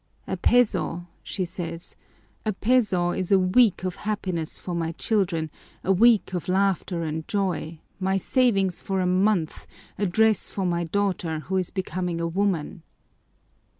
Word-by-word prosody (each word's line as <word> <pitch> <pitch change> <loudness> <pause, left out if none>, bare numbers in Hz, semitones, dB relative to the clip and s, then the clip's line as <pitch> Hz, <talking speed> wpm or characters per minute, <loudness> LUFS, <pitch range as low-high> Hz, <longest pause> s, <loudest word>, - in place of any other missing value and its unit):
"A - - -2
peso," 210 -8 +2 0.2
she 185 - -3
says, 170 -1 -6 0.5
"a 215 - 0
peso 195 -5 +2
is 185 +1 -3
a 195 - +7
week 190 +2 +3
of 185 -1 -3
happiness 185 -6 -2
for 180 - -6
my 165 -1 -2
children, 170 -6 0 0.3
a 190 - +2
week 215 0 +4
of 180 - -3
laughter 185 -2 +1
and 160 0 -4
joy, 185 -6 -2 0.2
my 190 0 +1
savings 195 -4 +1
for 195 -1 -2
a 185 - +1
month, 185 -2 +1 0.3
a 205 - +1
dress 220 +4 +2
for 195 - -3
my 170 -1 0
daughter 180 -3 -1
who 190 - -4
is 185 -2 -1
becoming 180 -3 -3
a 170 - -1
woman." 180 -1 -1
185 Hz, 150 wpm, -25 LUFS, 170-200 Hz, 0.5 s, a